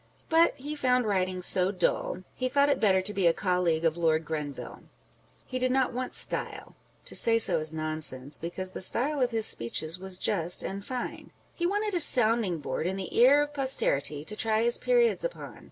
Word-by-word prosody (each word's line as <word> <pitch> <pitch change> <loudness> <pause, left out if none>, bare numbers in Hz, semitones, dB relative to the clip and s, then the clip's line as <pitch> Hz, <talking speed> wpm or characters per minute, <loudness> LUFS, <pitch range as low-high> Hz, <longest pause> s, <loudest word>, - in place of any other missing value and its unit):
But 325 +1 +3
he 290 +3 -7
found 250 -4 +1
writing 185 -3 -1
so 180 +1 +3
dull, 185 -1 -2
he 255 0 -3
thought 280 +2 +2
it 285 - +1
better 190 -3 +2
to 210 +2 -2
be 190 -3 +1
a 165 - +4
colleague 180 -4 -1
of 165 0 +1
Lord 160 -1 0
Grenville! 150 -3 -6 0.6
He 255 - -5
did 255 0 0
not 260 -1 0
want 255 +1 -4
style - - -5 0.3
(to - - -8
say 230 0 +5
so 225 - +5
is 155 0 -2
nonsense, 155 -4 -1
because 185 +3 -5
the - - -7
style 270 +9 +3
of 250 - +2
his 225 -2 +1
speeches 155 - -1
was 190 -1 -4
just 180 -3 0
and 195 +1 -6
fine) 250 +3 -6
â€" - - -22 0.2
he 345 - -2
wanted 415 +2 -2
a 355 - 0
sounding 225 - +3
board 155 +2 -4
in 190 - -3
the 195 -1 -7
ear 275 +5 +5
of 295 0 -8
posterity 155 - -1
to 210 - -7
try 220 +1 0
his 235 0 +2
periods 485 -1 +1
upon. - - -7
205 Hz, 200 wpm, -27 LUFS, 170-255 Hz, 0.6 s, say